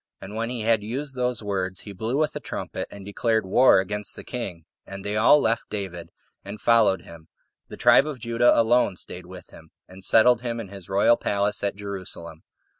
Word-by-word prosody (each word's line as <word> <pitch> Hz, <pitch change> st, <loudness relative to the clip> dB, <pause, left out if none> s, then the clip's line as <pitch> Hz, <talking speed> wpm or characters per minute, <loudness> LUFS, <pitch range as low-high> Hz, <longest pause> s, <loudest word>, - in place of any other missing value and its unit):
And 95 Hz, +2 st, -9 dB
when 115 Hz, +1 st, -2 dB
he 125 Hz, -2 st, -4 dB
had 110 Hz, 0 st, +2 dB
used 130 Hz, +6 st, -4 dB
those 125 Hz, -3 st, -2 dB
words, 95 Hz, -2 st, -2 dB
he 100 Hz, -, -9 dB
blew 110 Hz, +7 st, -2 dB
with 150 Hz, 0 st, 0 dB
a -, -, -3 dB
trumpet, 120 Hz, -, -5 dB
and 100 Hz, -1 st, -11 dB
declared 110 Hz, +1 st, 0 dB
war 125 Hz, +6 st, +5 dB
against 105 Hz, +2 st, -3 dB
the -, -, -9 dB
king; 95 Hz, -10 st, -6 dB, 0.2 s
and 95 Hz, 0 st, -9 dB
they 105 Hz, +1 st, -2 dB
all 115 Hz, +7 st, +6 dB
left 115 Hz, -4 st, -1 dB
David, 90 Hz, -5 st, -6 dB, 0.3 s
and 100 Hz, +2 st, -8 dB
followed 115 Hz, -5 st, +3 dB
him; 80 Hz, -1 st, -14 dB, 0.4 s
the -, -, -10 dB
tribe 145 Hz, -, +5 dB
of 150 Hz, -3 st, -5 dB
Judah 115 Hz, +1 st, +3 dB
alone 115 Hz, -3 st, +3 dB
staid 90 Hz, 0 st, -6 dB
with 90 Hz, -1 st, -12 dB
him, 80 Hz, 0 st, -15 dB, 0.2 s
and 95 Hz, +1 st, -14 dB
settled 115 Hz, +4 st, +5 dB
him 120 Hz, -1 st, -3 dB
in 105 Hz, -4 st, -7 dB
his 100 Hz, -1 st, -11 dB
royal 100 Hz, +4 st, +4 dB
palace 100 Hz, 0 st, -1 dB
at 100 Hz, -, -1 dB
Jerusalem. 95 Hz, -5 st, -7 dB
105 Hz, 200 wpm, -24 LUFS, 95-115 Hz, 0.4 s, all